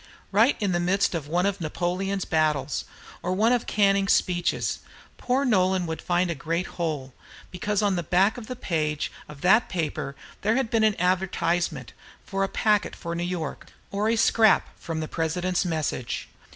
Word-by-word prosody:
Right 225 Hz, +7 st, +4 dB
in 205 Hz, -3 st, 0 dB
the 175 Hz, -, +1 dB
midst 185 Hz, +3 st, +1 dB
of 160 Hz, -4 st, -3 dB
one 175 Hz, +4 st, +1 dB
of 200 Hz, -2 st, -1 dB
Napoleon's 180 Hz, +4 st, -2 dB
battles, 150 Hz, -4 st, 0 dB, 0.4 s
or 180 Hz, -, -1 dB
one 215 Hz, +5 st, +3 dB
of 245 Hz, -, 0 dB
Canning's 195 Hz, -1 st, +3 dB
speeches, 175 Hz, -1 st, 0 dB, 0.4 s
poor 260 Hz, +3 st, +1 dB
Nolan 190 Hz, -5 st, +2 dB
would 160 Hz, -1 st, -4 dB
find 175 Hz, 0 st, +1 dB
a -, -, 0 dB
great 165 Hz, +2 st, -2 dB
hole, 150 Hz, -8 st, -4 dB, 0.4 s
because 205 Hz, +3 st, -1 dB
on 200 Hz, -2 st, +2 dB
the -, -, 0 dB
back 185 Hz, +5 st, +3 dB
of 235 Hz, -3 st, -8 dB
the 255 Hz, -, -5 dB
page 155 Hz, -, -1 dB, 0.2 s
of 145 Hz, -2 st, -11 dB
that 215 Hz, +6 st, +4 dB
paper 155 Hz, -5 st, -3 dB, 0.3 s
there 215 Hz, +3 st, +2 dB
had 265 Hz, -3 st, 0 dB
been 225 Hz, -1 st, +3 dB
an 215 Hz, -2 st, +2 dB
advertisement 175 Hz, -6 st, 0 dB, 0.4 s
of 195 Hz, -, -1 dB
a 195 Hz, -, +2 dB
packet 210 Hz, +1 st, +1 dB
for 170 Hz, -1 st, -5 dB
New 170 Hz, -, -3 dB
York, 175 Hz, -4 st, -4 dB, 0.2 s
or 205 Hz, +2 st, 0 dB
a 230 Hz, -, +3 dB
scrap 220 Hz, -1 st, +4 dB
from 160 Hz, -1 st, -4 dB
the 155 Hz, -, -3 dB
President's 175 Hz, +4 st, -1 dB
message. 155 Hz, -7 st, -2 dB
180 Hz, 180 wpm, -26 LUFS, 165-200 Hz, 0.4 s, Right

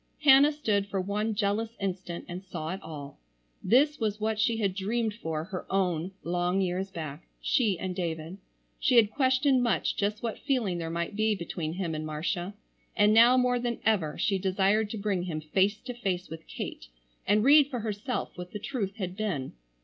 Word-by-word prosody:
Hannah 280 Hz, +1 st, +7 dB
stood 210 Hz, -10 st, 0 dB
for 195 Hz, -1 st, -2 dB
one 210 Hz, +3 st, -1 dB
jealous 220 Hz, +3 st, -1 dB
instant 185 Hz, -3 st, -4 dB
and 180 Hz, +2 st, -6 dB
saw 160 Hz, -4 st, -5 dB
it 190 Hz, +3 st, -4 dB
all. 145 Hz, -, -9 dB, 0.4 s
This 290 Hz, +5 st, +4 dB
was 215 Hz, -2 st, -1 dB
what 215 Hz, 0 st, -1 dB
she 225 Hz, +1 st, +2 dB
had 200 Hz, -4 st, 0 dB
dreamed 215 Hz, +3 st, -1 dB
for 160 Hz, -7 st, -4 dB
her 185 Hz, +1 st, -7 dB
own 180 Hz, -3 st, 0 dB
long 175 Hz, +2 st, 0 dB
years 190 Hz, +1 st, -1 dB
back, 155 Hz, -3 st, -7 dB
she 225 Hz, -, +1 dB
and 185 Hz, 0 st, -4 dB
David. 170 Hz, 0 st, -4 dB, 0.4 s
She 255 Hz, -, +2 dB
had 225 Hz, -3 st, +6 dB
questioned 260 Hz, +1 st, +3 dB
much 235 Hz, -2 st, +1 dB
just 210 Hz, +2 st, -1 dB
what 230 Hz, -2 st, -3 dB
feeling 230 Hz, -11 st, 0 dB
there 165 Hz, -1 st, -3 dB
might 170 Hz, +3 st, -3 dB
be 215 Hz, 0 st, +2 dB
between 170 Hz, -3 st, -4 dB
him 175 Hz, -3 st, -3 dB
and 155 Hz, 0 st, -3 dB
Marcia, 175 Hz, +5 st, -3 dB, 0.4 s
and 210 Hz, 0 st, +5 dB
now 235 Hz, +3 st, +7 dB
more 250 Hz, -1 st, +2 dB
than 240 Hz, -1 st, -2 dB
ever 190 Hz, -9 st, +1 dB
she 195 Hz, -2 st, +1 dB
desired 195 Hz, +3 st, +2 dB
to 220 Hz, -, -4 dB
bring 200 Hz, -3 st, -1 dB
him 160 Hz, -4 st, -3 dB
face 190 Hz, +7 st, +1 dB
to 250 Hz, 0 st, -6 dB
face 190 Hz, -6 st, -3 dB
with 160 Hz, 0 st, -9 dB
Kate -, -, -6 dB, 0.4 s
and 210 Hz, +1 st, +4 dB
read 285 Hz, +2 st, +7 dB
for 245 Hz, -5 st, -3 dB
herself 215 Hz, +3 st, -3 dB
what 180 Hz, 0 st, -8 dB
the 210 Hz, -, -4 dB
truth 205 Hz, -4 st, -3 dB
had 185 Hz, -5 st, -4 dB
been. 190 Hz, -11 st, -3 dB
200 Hz, 190 wpm, -28 LUFS, 180-225 Hz, 0.4 s, Hannah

